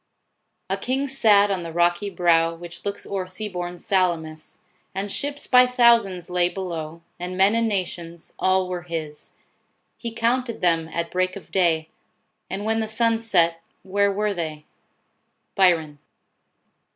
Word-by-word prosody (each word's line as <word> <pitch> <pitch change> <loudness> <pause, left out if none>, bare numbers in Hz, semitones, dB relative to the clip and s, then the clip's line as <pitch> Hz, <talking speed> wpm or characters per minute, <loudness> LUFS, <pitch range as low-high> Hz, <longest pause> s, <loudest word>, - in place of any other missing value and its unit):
" - - -51
A - - +1
king 270 +2 -1
sat 210 -6 +4
on 190 -2 -1
the 165 -1 -6
rocky 175 +4 +1
brow 165 -3 +2
Which 175 0 -10
looks 200 0 -3
o'er 190 -2 -3
sea 200 +4 -5
born 180 -2 -5
Salamis: 165 -4 -1 0.3
And 195 +1 -3
ships, 285 +4 -3
by 250 -1 +6
thousands, 235 -8 +3
lay 180 -1 +1
below, 170 -3 -6 0.2
And 180 +1 -5
men 195 +2 +5
in 230 0 +2
nations: 170 -4 -4
all 185 0 +2
were 180 -1 -4
his. 160 -3 -7 0.6
He 235 - -5
counted 235 +1 0
them 165 -2 +1
at 170 +1 -3
break 185 0 0
of 200 - -11
day 165 -4 +2 0.6
And 200 +2 -4
when 225 0 +1
the 220 - -1
sun 225 +1 +2
set, 170 -7 +2 0.2
where 200 +2 +1
were 210 +1 0
they? 155 -4 -5 0.4
" - - -48
BYRON. 165 -6 +2
185 Hz, 155 wpm, -23 LUFS, 170-210 Hz, 0.6 s, by